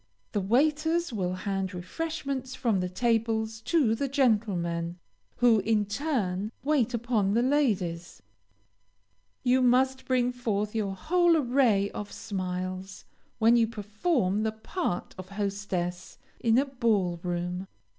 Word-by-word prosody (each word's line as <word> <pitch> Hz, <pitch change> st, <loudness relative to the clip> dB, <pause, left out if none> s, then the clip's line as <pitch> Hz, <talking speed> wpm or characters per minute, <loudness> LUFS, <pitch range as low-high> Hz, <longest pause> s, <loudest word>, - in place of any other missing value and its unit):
The 205 Hz, -, 0 dB
waiters 310 Hz, -, +1 dB
will 185 Hz, -4 st, -1 dB
hand 190 Hz, 0 st, -3 dB
refreshment 275 Hz, -, -4 dB
from 235 Hz, -6 st, 0 dB
the 180 Hz, 0 st, -1 dB
tables 225 Hz, +1 st, 0 dB
to 290 Hz, -10 st, +3 dB
the 275 Hz, +5 st, -1 dB
gentlemen, 195 Hz, -, 0 dB, 0.4 s
who, 240 Hz, -3 st, +4 dB
in 210 Hz, +1 st, +1 dB
turn, 205 Hz, -5 st, -1 dB
wait 265 Hz, -5 st, +2 dB
upon 220 Hz, -4 st, +1 dB
the 235 Hz, -, +3 dB
ladies. 205 Hz, -, 0 dB, 1.2 s
You 255 Hz, 0 st, +3 dB
must 260 Hz, +1 st, +3 dB
bring 250 Hz, -1 st, +2 dB
forth 210 Hz, -4 st, -2 dB
your 205 Hz, -4 st, -1 dB
whole 345 Hz, -, +3 dB
array 240 Hz, -7 st, +2 dB
of 205 Hz, -1 st, -6 dB
smiles, 185 Hz, -1 st, -5 dB, 0.3 s
when 230 Hz, +1 st, +5 dB
you 230 Hz, -1 st, +4 dB
perform 215 Hz, -, 0 dB
the 220 Hz, 0 st, 0 dB
part 220 Hz, -, -3 dB
of 185 Hz, 0 st, -8 dB
hostess 195 Hz, -3 st, -3 dB, 0.2 s
in 230 Hz, 0 st, +3 dB
a 270 Hz, -, +4 dB
ball 220 Hz, -10 st, 0 dB
room. 180 Hz, +1 st, -3 dB
220 Hz, 125 wpm, -28 LUFS, 190-255 Hz, 1.2 s, when